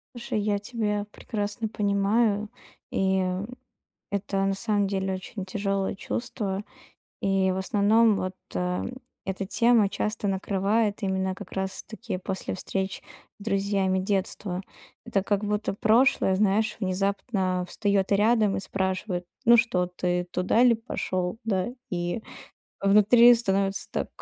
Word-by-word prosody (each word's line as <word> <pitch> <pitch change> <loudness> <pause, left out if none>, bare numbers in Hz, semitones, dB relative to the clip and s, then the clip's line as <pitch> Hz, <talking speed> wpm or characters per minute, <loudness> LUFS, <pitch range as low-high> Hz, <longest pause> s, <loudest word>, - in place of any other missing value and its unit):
Слушай, 235 -3 -2
я 205 -1 0
тебя 210 -2 -2
прекрасно 210 +1 -3
понимаю. 205 +1 +1 0.4
И 190 0 +2 0.9
это 200 -1 -1
на 195 - +1
самом 205 -1 +1
деле 190 -1 -1
очень 185 +1 -6
тяжелое 195 0 -1
чувство. 205 -2 -3 0.6
И, 195 -1 +2
в 185 - -2
основном, 210 +3 +3
вот 185 -1 -3 0.9
эта 190 +1 -2
тема 230 -1 +4
часто 210 0 -2
накрывает 200 +3 0
именно 190 -1 0
как - - -10
раз 190 0 -2
таки 220 -3 -6
после 190 0 -3
встреч 190 +1 -3 0.4
с 200 - -10
друзьями 195 -2 +1
детства. 190 -1 -1 0.4
Это 200 -5 0
как 205 0 0
будто 210 0 -1
прошлое, 215 -2 +3
знаешь, 215 +2 +2
внезапно 190 -1 -1
встаёт 200 -1 0
рядом 210 0 +3
и - - -1
спрашивает: 190 -1 -2 0.2
"Ну 235 +1 +8
что 185 -7 +2
ты 180 0 -1
туда 180 +5 +1
ли 240 -2 +6
пошёл?" 185 -4 -3
Да. 195 -1 0 0.2
И 175 +4 -2 0.6
внутри 210 +5 +7
становится 195 -3 0
так - - -2
200 Hz, 125 wpm, -26 LUFS, 190-215 Hz, 0.9 s, Ну